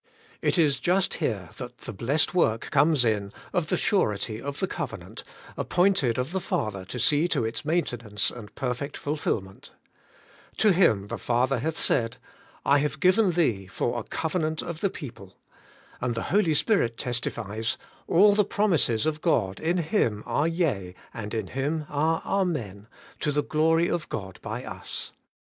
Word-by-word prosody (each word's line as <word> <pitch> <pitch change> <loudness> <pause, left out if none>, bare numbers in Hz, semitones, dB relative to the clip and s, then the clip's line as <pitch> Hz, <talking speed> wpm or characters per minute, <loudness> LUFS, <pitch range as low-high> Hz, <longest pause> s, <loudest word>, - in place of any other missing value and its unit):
' - - -28
It - - 0
is 150 -5 +3
just 185 +2 +2
here 100 - -2
that - - -8
the - - -7
blessed 135 - +1
work 115 -11 +1
comes 150 -5 +4
in 105 -3 0 0.2
of 175 -3 +1
the - - +1
surety 110 - 0
of 140 0 -5
the 190 - +2
covenant, - - -6 0.3
appointed 175 - +2
of 125 +4 -2
the 190 - 0
Father 100 - -2
to 125 - -6
see 150 +7 +4
to 120 - 0
its 115 - -3
maintenance 120 - 0
and 115 -4 -11
perfect 135 +2 -3
fulfilment. 110 -10 -3 0.8
To 215 - +5
Him 110 - +4
the - - -4
Father 125 +2 +1
hath 160 +6 -2
said, 115 -6 +1 0.5
*I 140 +1 +5
have 150 +1 -1
given 185 0 +4
thee 115 - +1
for 120 +5 -1
a - - -5
covenant 160 +2 -2
of 170 -2 -5
the 200 - +2
people.' 115 - -10 0.6
And 120 -1 -1
the 115 - -2
Holy 190 -7 +3
Spirit 140 - +2
testifies, 115 -3 -2 0.3
*A11 200 +4 +6
the 210 - +4
promises 165 - +2
of 155 -1 -1
God 105 - +1
i^ 170 +3 0
Him 135 - 0
are 150 - +1
yea, 135 - -1 0.2
and 105 -2 -6
in 110 - -1
Him 150 +4 -2
are 155 +3 +1
Amen, 125 - -1 0.3
to 150 - 0
the 145 0 +1
glory 165 +2 +2
of 170 -2 -2
God 95 -4 -5
by - - -5
us.' - - -5
145 Hz, 165 wpm, -26 LUFS, 110-165 Hz, 0.8 s, A11